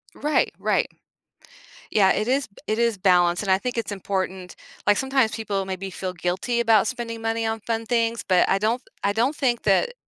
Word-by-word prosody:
Right, 300 +1 +1
right. - - +1 1.0
Yeah, 195 -3 +4
it 215 - 0
is 265 +1 +1
b 200 - -34
it 215 - 0
is 235 -3 +2
balanced, 175 -1 +3
and 195 - -1
I 190 - +5
think 245 +4 -4
it's 225 -2 -2
important 190 -2 -3 0.3
like, 205 - +4
sometimes 265 -4 +2
people 200 -3 -3
maybe 190 0 -5
feel 185 0 -5
guilty 180 +7 -1
about 225 -2 +4
spending 230 -2 -4
money 225 0 -1
on 225 -1 -2
fun 225 0 -2
things, 230 -1 0
but 185 -2 +4
I - - +3
don't 220 +5 0
th - - -38 0.2
I 200 - +2
don't 245 +7 +1
think 245 -4 0
that 215 - +2
220 Hz, 200 wpm, -24 LUFS, 190-235 Hz, 1.0 s, I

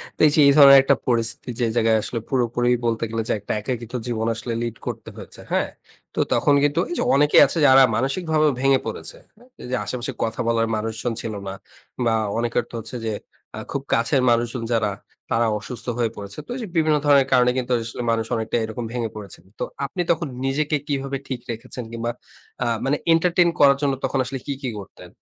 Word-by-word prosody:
তো - - -36
এই - - +2
যে - - +3
এই - - +7
ধরনের 140 -1 +10
একটা - - +4
পরিস্থিতি, 115 +1 -1
যে 120 - +2
জায়গায় 115 -1 +3
আসলে 115 - -3
পুরোপুরি 120 -1 +1 0.2
বলতে 115 0 0
গেলে 115 0 -2
যে, - - +3
একটা 100 - -4
একাকিত্ব 120 0 -5
জীবন 115 -1 -1
আসলে 115 +1 -4
লিড 115 -1 -4
করতে - - -5
হয়েছে। - - -10
হ্যাঁ? - - +1 0.5
তো - - -2
তখন 145 - +3
কিন্তু 145 0 +2
এই 350 - -3
যে - - +1
অনেকেই 150 +1 +6
আছে - - -3
যারা 135 0 +8
মানসিকভাবে 155 +4 +1
ভেঙে 135 -1 +4
পড়েছে। - - -6 0.2
হ্যাঁ? 245 +4 -21
এই - - -7
যে - - +1
আশেপাশে 125 -1 -4
কথা 110 - -3
বলার 115 -1 +2
মানুষজন 110 +2 -3
ছিল 110 - -4
না। 95 - -4 0.5
বা 115 - +3 0.2
অনেকের 120 0 0
তো - - -21
হচ্ছে 115 +3 -8
যে, 110 - -1 0.5
আ - - -4
খুব - - -2
কাছের 115 +4 +2
মানুষজন 120 0 0
যারা, 105 -3 +1 0.4
তারা 115 0 +2
অসুস্থ 120 0 -7
হয়ে 115 -2 0
পড়েছে। 100 0 -8
তো - - -34
ওইযে 235 -5 -5
বিভিন্ন 155 -1 +3
ধরনের 140 -2 +5
কারণে 125 -1 +5
কিন্তু 125 0 -2
আসলে 115 +1 -5
মানুষ 115 -1 0
অনেকটা 110 +1 -1
এরকম 110 +2 -5
ভেঙে 115 -2 -2
পড়েছেন। 100 -4 -9 0.2
তো - - -1 0.2
আপনি 180 +6 -3
তখন 165 -1 0 0.2
নিজেকে 150 +3 0
কীভাবে 135 -1 -2
ঠিক 130 -3 -4
রেখেছেন 125 +2 -7
কিংবা 115 0 -3 0.5
আ - - -1 0.2
মানে, 145 +2 +1 0.2
এন্টারটেইন 175 +1 +3
করার 140 -1 +6
জন্য 140 -1 +1
তখন 135 - 0
আসলে 135 0 -5
কী, 140 - -1
কী 125 - -1
করতেন? 95 - -12
125 Hz, 205 wpm, -22 LUFS, 115-140 Hz, 0.5 s, ধরনের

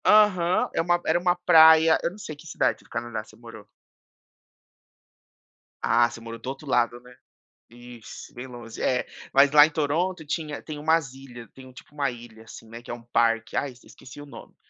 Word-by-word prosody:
Aham, 185 -5 +3
é - - 0
uma 175 +1 +1
era - - +2
uma 180 0 +1
praia 160 -2 +6
eu - - 0
não 185 - -14
sei 160 -7 -8
que 150 +3 -15
cidade 155 - -1
do - - -25
Canadá 120 -2 -5
você 110 - -19
morou. 115 -2 -13 2.2
Ah, 120 0 +3
você - - -11
morou 115 0 -9
do 120 - -11
outro 135 +3 -7
lado, 120 -2 0
né? 125 0 -17 0.6
Isso, 120 -1 -12
bem 125 +2 -8
longe. 120 -3 -11
É, 125 -1 0 0.3
mas 140 +1 +5
lá 145 -1 +8
em - - -7
Toronto 160 +3 -2
tinha 150 0 -4
tem 155 -2 -8
umas 155 -3 0
ilhas 125 -3 -12
tem 130 -1 -14
um, 130 - -15
tipo, 130 - -16
uma 140 -2 -1
ilha, 115 -2 -13
assim, 115 0 -13
né, 115 +1 -11
que - - -13
é - - -3
um 120 - -12
parque. 115 -1 0
Ai, 140 - -2
esqueci 130 +2 -14
o 145 - -11
nome. 140 - -13
135 Hz, 200 wpm, -25 LUFS, 120-160 Hz, 2.2 s, lá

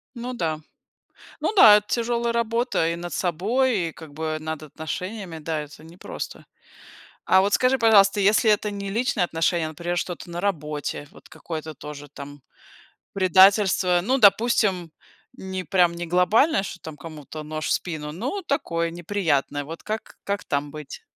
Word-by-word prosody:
Ну 245 +1 -5
да. 160 -8 -2 0.8
Ну - - 0
да, 215 - +9
это 210 0 -1
тяжелая 235 0 0
работа 235 -6 0
и 170 - -2
над 175 0 -7
собой, 195 +3 0
и, 160 - -9
как 155 -3 -13
бы, 155 0 -3
над 155 0 -5
отношениями. 170 +5 -6
Да, 155 0 -3
это 150 +1 -11
непросто. 170 +3 -8 0.8
А 190 - +5
вот 200 +1 0
скажи, 255 +1 +3
пожалуйста, 205 -4 +5
если 215 +3 +4
это 210 0 +2
не 200 -1 -5
личные 230 -1 0
отношения, 165 0 0
а, - - -5
например, 175 +3 -4
что-то 175 0 -4
на 175 - -4
работе. 150 -6 -3
Вот - - -17
какое-то 160 -1 -7
тоже 145 +1 -9
там 145 0 -10 0.7
предательство, 190 -1 +4
ну, 255 +9 +1
допустим, 200 -5 +3 0.4
не 190 -1 -6
прям 180 -3 +3
не 170 0 -5
глобальное, 195 - +3
что 190 - -7
там 155 -2 -9
кому-то 155 0 -9
нож 155 +1 -4
в - - -1
спину, 150 -4 -2
ну 250 - -4
такое, 170 - -1
неприятное, 165 -5 -1
вот 165 +3 -9
как 215 +1 -5
как 200 0 -3
там 145 0 -2
быть? 150 -2 -9
180 Hz, 160 wpm, -24 LUFS, 160-210 Hz, 0.8 s, да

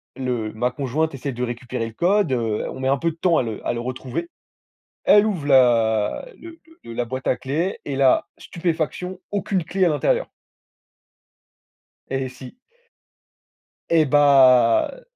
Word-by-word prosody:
le 125 -5 -3
ma 120 +3 -1
conjointe 145 +4 -2
essaie 135 +1 -4
de 125 +1 -4
récupérer 120 0 -4
le 110 - -10
code, 185 - +1
heu, 115 -3 -1
on - - -8
met 130 - -2
un 140 - +2
peu 165 +4 -1
de - - -14
temps 170 -1 +2
à - - +2
le 110 -2 -6
à - - 0
le 120 - -4
retrouver. 130 +7 -5 0.7
Elle 205 +1 +6
ouvre 180 -9 -2
la 115 - +3
le 335 0 -12 0.2
le 115 - -9
la 120 +1 -2
boîte 130 +2 -5
à - - +2
clés 155 +9 -2
et 140 - -3
là 135 -1 +3
stupéfaction 175 +2 -3
aucune, 195 -3 -1
clé 185 +2 0
à - - +3
l'intérieur. 145 -3 0 1.8
Et 135 0 -2
si. 130 - -12 1.3
Eh 160 -2 +4
bah 130 -5 +5
heu - - -14
135 Hz, 160 wpm, -22 LUFS, 125-165 Hz, 1.8 s, Elle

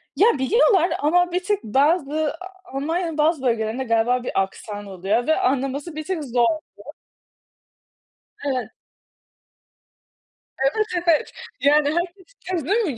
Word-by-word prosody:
Ya, 410 - +5
biliyorlar 380 - +3
ama 355 +4 +2
bir 360 +1 -1
tık 410 - -1
bazı 295 +5 +1
A 375 -3 -13
Almanya'nın 325 +3 -2
bazı 305 -1 +2
bölgelerinde 230 0 0
galiba 240 +1 +1
bir - - -3
aksan 205 +1 -6
oluyor 195 - -1
ve 315 - +3
anlaması 275 +4 -1
bir 310 - -4
tık 340 -4 -3
zor 245 -2 0
oluyor. 310 +6 -3 1.5
Evet. 250 -6 -2 2.0
Evet, 430 -1 +2 0.2
evet. 320 -3 +3 0.3
Yani, 290 +1 +4 0.6
herkes 365 - 0
295 Hz, 115 wpm, -22 LUFS, 250-350 Hz, 2.0 s, Ya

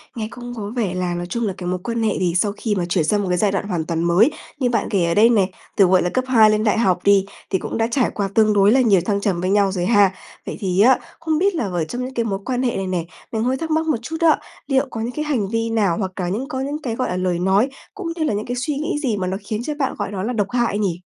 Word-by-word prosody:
nghe 220 -2 -3
cũng 245 0 -8
có 205 -3 -5
vẻ 210 -7 -1
là 180 -1 -2
nói 175 0 -3
chung 235 +2 -1
là 195 - -2
cái 175 - -5
mối 180 0 -1
quan 230 0 -2
hệ 215 - +2
thì 180 -2 +1
sau 200 +2 +2
khi 215 -3 -1
mà 180 -3 -1
chuyển 175 -2 +1
sang 205 +5 +1
một 185 - -3
cái 180 - +1
giai 205 0 +2
đoạn 200 +1 -2
hoàn 170 -5 -2
toàn 165 0 -1
mới, 180 - +4 0.3
như 250 - +1
bạn 230 -3 0
kể 190 -4 +1
ở 170 - +1
đây 220 +4 +6
này, 200 -5 +3 0.3
từ, 195 - +7
gọi 185 0 +4
là, 175 - 0
cấp 255 +5 0
2 225 -4 +6
lên 215 0 +1
đại 215 0 +2
học 185 -5 +2
đi, 200 -1 +4 0.2
thì 190 - 0
cũng - - -4
đã 225 0 +1
trải 250 -1 +2
qua 200 -1 -1
tương 215 -1 +4
đối 200 +1 +5
là 260 +1 +5
nhiều 200 -7 +4
thăng 200 -1 0
trầm 185 -4 0
với 185 - -1
nhau 200 -1 +3
rồi 180 -2 -2
ha. 205 -3 +4 0.3
Vậy - - -5
thì 190 -1 +1
á, 255 +3 +6 0.2
không 320 -1 0
biết 390 +2 +2
là 250 - -1
ở 175 -4 -2
trong 245 +9 -4
những 260 - -7
cái 235 - 0
mối 195 -3 -2
quan 255 0 -1
hệ 245 - 0
này 195 -1 -2
nè, 180 -3 -2 0.3
mình 220 0 -1
hơi 260 +2 +1
thắc 320 +1 -4
mắc 320 +1 +1
một 305 - +2
chút 320 +7 -5
á, 325 -2 +4 0.3
liệu 270 0 +2
có 225 - -5
những 235 +2 -2
cái 300 +4 -3
hành 255 -10 0
vi 230 0 -1
nào 205 -7 +1
hoặc 190 -3 -2
là 180 -1 -1
những 225 +9 -3
có 260 - -4
những 290 +3 -3
cái, 235 -5 -3
gọi 255 - -1
là, 180 - -2
lời 180 -2 0
nói, 195 +7 +2 0.2
cũng 400 -4 -6
như 320 - -2
là 295 - 0
những 210 +1 -2
cái 245 - -3
suy 250 +4 -2
nghĩ 305 +4 -2
gì 240 -8 -1
mà 185 -1 -2
nó 190 +1 -2
khiến 215 +2 -3
cho 300 - -3
bạn 270 -2 0
gọi 205 -1 -3
đó 190 -2 -4
là 245 +4 -2
độc 205 -3 0
hại 240 -4 0
nhỉ? 180 -5 -1
210 Hz, 320 wpm, -21 LUFS, 190-245 Hz, 0.3 s, từ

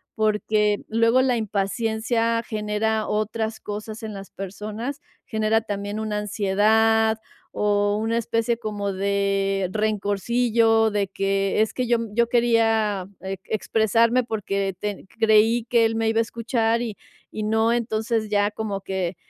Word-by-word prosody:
porque 210 -1 +1
luego 230 +3 +3
la 255 -2 +2
impaciencia 225 +2 0
genera 215 0 -1
otras 220 +1 -2
cosas 215 +1 -6
en 215 - -5
las 195 0 -9
personas, 215 +8 -6 0.3
genera 220 0 +1
también 205 0 -4
una 215 -1 -2
ansiedad 220 +2 +2 0.4
o 205 0 +2
una 225 +2 0
especie 230 0 0
como 205 -3 -3
de 195 -1 0
rencorcillo 225 +2 +2
de 205 -1 0
que 195 +1 0
es 220 - 0
que 255 - -1
yo 235 -1 +3 0.2
yo 235 +2 +3
quería 225 -5 +2
ex 190 0 -5
expresarme 225 +3 +2
porque 200 -4 -2
te 205 -2 -4
creí 225 +1 +4
que 235 -2 +4
él 225 0 0
me 225 0 +1
iba 225 0 +1
a - - +5
escuchar 230 0 0
y 220 -4 -4 0.4
y 215 - -2
no. 220 +2 +2
Entonces, 220 -1 -1
ya 205 0 +2
como 210 -2 -4
que 190 -2 -3
220 Hz, 140 wpm, -23 LUFS, 205-225 Hz, 0.4 s, a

